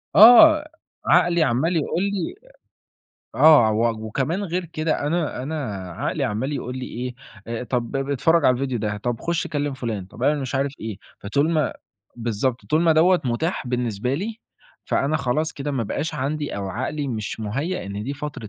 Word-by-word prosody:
آه. 300 +8 +9 0.4
عقلي 170 -2 +4
عمَّال 150 +7 +1
يقول 170 +4 -1
لي 200 - -2 1.0
آه. 150 -9 +7
و 110 0 0
وكمان 150 - -1
غير 180 0 -2
كده 155 -2 -2
أنا 155 -5 -1
أنا 155 +4 -4 0.4
عقلي - - -2
عمَّال 115 +8 -2
يقول 125 -2 -4
لي 130 - -5
إيه، 125 +1 -5 0.3
آآ 115 +1 -4
طَب 120 +1 -2
اتفرّج 140 +4 +2
على 125 - +5
الفيديو 130 -2 -2
ده، 105 -1 -2
طَب 120 +2 -3
خُش 170 -1 -1
كلِّم 145 -2 -2
فُلان، 115 -7 -4
طب 115 +5 -11
اعمل 145 +1 +2
مش 135 +1 -4
عارف 135 +1 0
إيه. 110 -3 -5 0.2
فطول 140 +10 0
ما 155 -5 +1 0.4
بالضبط. 120 +2 -2
طول 155 +2 +2
ما 165 -1 +5
دوّة 175 +3 +4
متاح 130 +5 -1
بالنسبة 125 0 -1
لي، 215 +8 -4 0.5
فأنا 150 +3 +1
خلاص 150 +5 -1
كده 145 +1 -4
ما 130 -4 -1
بقاش 145 +8 -3
عندي 145 +1 -3
أو 100 -1 -4
عقلي 135 +7 -3
مش 110 -2 -4
مُهيّأ 135 - -3
إن 100 +1 -5
دي 140 +5 -4
فترة 145 -7 -6
140 Hz, 175 wpm, -23 LUFS, 120-160 Hz, 1.0 s, آه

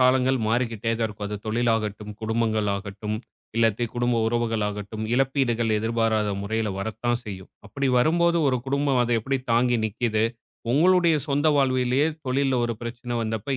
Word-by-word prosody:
காலங்கள் 130 +1 +3
மாறிக்கிட்டே 115 -1 0
தான் 115 - +1
இருக்கும் 105 -1 -6
அது 105 0 -4
தொழில்லாகட்டும், 110 -2 -1
குடும்பங்கள் 110 -1 0
ஆகட்டும், 100 +1 -5 0.4
இல்லாட்டி 115 0 +2
குடும்ப 120 0 +1
உறவுகள் 115 -2 0
ஆகட்டும், 105 +1 -5
இழப்பீடுகள் 125 -3 +1
எதிர்பாராத 110 -1 +1
முறையில 110 +1 -1
வரத்தான் 110 +3 -1
செய்யும். 95 -2 -8 0.2
அப்படி 135 +6 -2
வரும்போது 170 +5 +3
ஒரு 130 - +2
குடும்பம் 140 -1 +1
அத 120 0 0
எப்படி 135 +4 -1
தாங்கி 120 +1 +3
நிக்கிது? 110 0 0 0.5
உங்களுடைய 175 +2 +4
சொந்த 145 +2 +1
வாழ்விலே 130 -1 +2 0.2
தொழில்ல 135 +1 +1
ஒரு 115 -1 -2
பிரச்சனை 120 +1 -6
வந்தப்ப 110 +5 -2
115 Hz, 140 wpm, -25 LUFS, 110-130 Hz, 0.5 s, உங்களுடைய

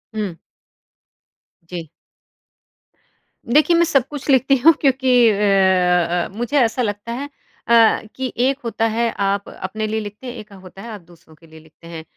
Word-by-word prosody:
हुँ। 195 -6 -4 1.3
जी। 170 -3 -8 1.6
देखिए, 300 +7 +3
मैं 340 - +4
सब 275 -5 +1
कुछ 290 0 -8
लिखती 270 +1 +4
हूँ, 320 +6 +6
क्योंकि 260 -4 +3
अ 210 - +1
अ 180 -4 +2
अ, - - -9
मुझे 240 +5 -1
ऐसा 240 +1 +1
लगता 205 +1 -4
है 280 +4 -5 0.4
अ, 230 -1 +4
कि 260 -1 -4
एक 265 +3 +1
होता 225 0 -1
है 235 0 0
आप 200 0 -1
अपने 215 +3 -5
लिए 220 +1 -2
लिखते 210 +4 -9
हैं, 245 - -6
एक 210 -1 -11
होता 190 0 -13
है 235 - -9
आप 205 -4 -9
दूसरों 165 -2 -21
के 165 +2 -21
लिए 160 0 -15
लिखते 160 +1 -19
हैं। 165 -1 -8
215 Hz, 175 wpm, -19 LUFS, 185-255 Hz, 1.6 s, हूँ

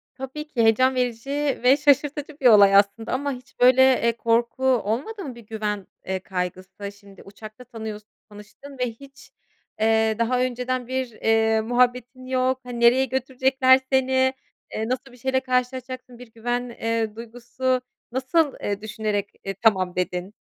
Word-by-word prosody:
Tabii 270 +3 -7
ki 255 -6 -1
heyecan 255 +4 +4
verici 245 0 -2 0.3
ve 260 +3 +6
şaşırtıcı 290 +1 +1
bir 270 - -6
olay 200 -3 +7
aslında 200 +4 +2
ama 280 +2 -1
hiç 250 -1 -14
böyle, 255 +1 +6 0.2
eee, 235 0 +1
korku 235 +3 0
olmadı 260 - 0
mı, 255 -4 -7
bir 235 - -12
güven, 210 -2 -4 0.2
eee, 190 0 -2
kaygısı, 185 +2 -5
şimdi 200 -1 -17
uçakta 215 +4 -12
tanıyorsun 220 -3 -8 0.2
tanıştın 215 +7 -13
ve 250 -1 0
hiç, 275 +4 -16 0.5
eee, 220 0 +2
daha 245 +2 +1
önceden 250 0 -2
bir, 260 -1 -3
eee, 220 0 +2
muhabbetin 250 +2 0
yok, 255 0 0
hani, 245 -1 -7
nereye 245 +3 +5
götürecekler 260 0 +2
seni, 260 0 +2 0.4
eee, 220 +1 -2
nasıl 260 +1 -3
bir 245 - -16
şeyle 260 +2 0
karşılaşacaksın, 255 -1 -3
bir 245 -2 -13
güven, 245 +2 -3
eee, 225 -2 -2
duygusu, 245 +3 -3 0.3
nasıl 265 +4 +1
e 205 0 -3
düşünerek, 210 -2 -3
e, 195 - -4
"Tamam," 190 -3 +1
dedin? 180 +2 -3
245 Hz, 150 wpm, -23 LUFS, 220-260 Hz, 0.5 s, olay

